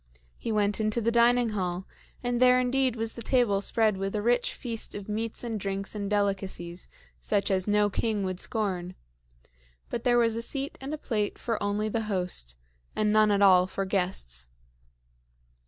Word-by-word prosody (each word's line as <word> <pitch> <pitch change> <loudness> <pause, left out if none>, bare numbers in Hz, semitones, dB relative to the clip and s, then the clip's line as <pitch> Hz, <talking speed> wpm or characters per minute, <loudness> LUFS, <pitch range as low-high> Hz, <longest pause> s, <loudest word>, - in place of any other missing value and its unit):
He 230 - -3
went 205 -1 +1
into 215 +1 +1
the 230 0 +1
dining 235 0 +4
hall, 185 -3 -3 0.4
and 245 0 -1
there 250 0 +6
indeed 255 0 +1
was 225 -1 -2
the 235 - -8
table 230 -5 +2
spread 215 0 +2
with 195 +2 -3
a 210 - 0
rich 245 +1 +2
feast 230 -3 -2
of 205 -1 -7
meats 220 +2 -3
and 225 -3 -3
drinks 195 0 -3
and 205 -2 -4
delicacies 195 -4 -2 0.3
such 200 - 0
as 185 0 +1
no 210 0 +3
king 210 0 -1
would 185 -1 -3
scorn; 185 -5 -2 1.0
but 235 - -3
there 245 -2 +3
was 230 -2 +3
a 230 - -2
seat 275 +4 -3
and 270 +2 -5
a 310 - -3
plate 210 -7 -2
for 230 -3 -3
only 205 +1 0
the 225 +1 -1
host, 180 - -2 0.4
and 210 0 +1
none 215 0 +5
at 200 -1 +3
all 185 -2 +6
for 195 +1 -3
guests. 180 - -2
210 Hz, 180 wpm, -28 LUFS, 195-230 Hz, 1.0 s, there